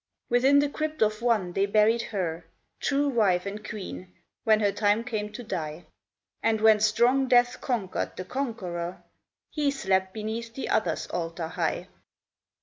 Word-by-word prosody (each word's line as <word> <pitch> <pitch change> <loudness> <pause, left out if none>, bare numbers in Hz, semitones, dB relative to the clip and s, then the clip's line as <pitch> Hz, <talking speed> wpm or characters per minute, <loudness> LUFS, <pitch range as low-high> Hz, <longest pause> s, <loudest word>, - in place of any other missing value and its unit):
Within 260 +4 +5
the 290 +1 +4
crypt 310 -1 -1
of 215 +1 0
one 215 -7 +1
they 195 +2 +1
buried 215 +3 +3
her, 175 -7 -3 0.3
True 285 0 +1
wife 205 -9 +2
and 205 +2 -5
queen, 190 -4 -7 0.3
when 215 -1 +5
her 205 -2 +2
time 205 +2 +2
came 215 -3 -3
to 245 - -7
die; 165 -6 -5 0.6
And 225 -1 +2
when 220 0 +6
strong 240 +5 +3
death 245 0 +3
conquered 225 -8 -2
the 185 - -5
Conqueror, 185 -10 -4 0.5
He 295 -3 +1
slept 190 -8 0
beneath 225 +2 -5
the 270 - -4
other's 175 -7 0
altar 165 -1 -3
high. - - -2
215 Hz, 150 wpm, -27 LUFS, 190-245 Hz, 0.6 s, when